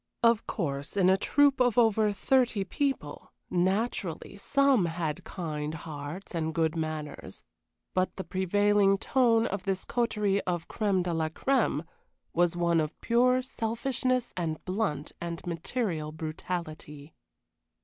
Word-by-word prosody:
Of 230 -1 +4
course, 145 -2 -3
in 185 -1 +5
a - - +6
troop 285 +7 +3
of 245 -2 +3
over 220 -2 +4
thirty 240 0 +2
people, 220 - -3 0.2
naturally 190 0 -1
some 270 0 +3
had 165 -2 -3
kind 155 -3 -4
hearts 155 +4 -7
and 160 -2 -2
good 160 -1 +1
manners, 155 -2 -5 0.5
but 185 0 0
the 190 - -4
prevailing 195 +2 +3
tone 230 0 +3
of 200 -4 -2
this 190 -1 -1
coterie 210 -5 +1
of 175 -2 -3
crème 200 -4 0
de 175 -1 -2
la 160 -1 0
crème 215 - +1 0.5
was 175 0 +2
one 170 -1 +3
of 155 -1 -4
pure 250 +2 +3
selfishness 255 +1 -1
and 160 -3 -3
blunt 185 -6 -2
and 170 -1 -5
material 170 -2 -2
brutality. 155 -2 -6
185 Hz, 130 wpm, -29 LUFS, 160-225 Hz, 0.5 s, a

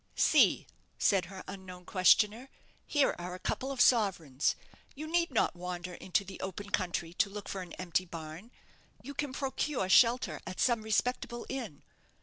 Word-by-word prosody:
"See," - - +4 0.3
said 190 -3 +3
her 190 +1 -9
unknown 185 -2 -9
questioner, 210 +7 +3 0.4
"here 290 -3 +3
are 180 +1 -5
a - - -10
couple 265 +8 -2
of 270 - -6
sovereigns. 180 - +3 0.4
You 300 +3 -6
need 340 +2 +1
not 230 - +1
wander 180 0 -5
into 185 +3 -1
the 190 0 -9
open 200 +2 -6
country 175 -2 -1
to 200 +3 +1
look 205 0 -7
for 195 - -4
an 180 -2 -9
empty 185 0 -1
barn. 165 +4 -8 0.5
You 280 - -7
can 290 -1 -3
procure 270 -4 -2
shelter 240 +5 +4
at 185 - -6
some 235 -3 +2
respectable 240 +2 -1
inn. 235 - -5
195 Hz, 160 wpm, -31 LUFS, 180-250 Hz, 0.5 s, See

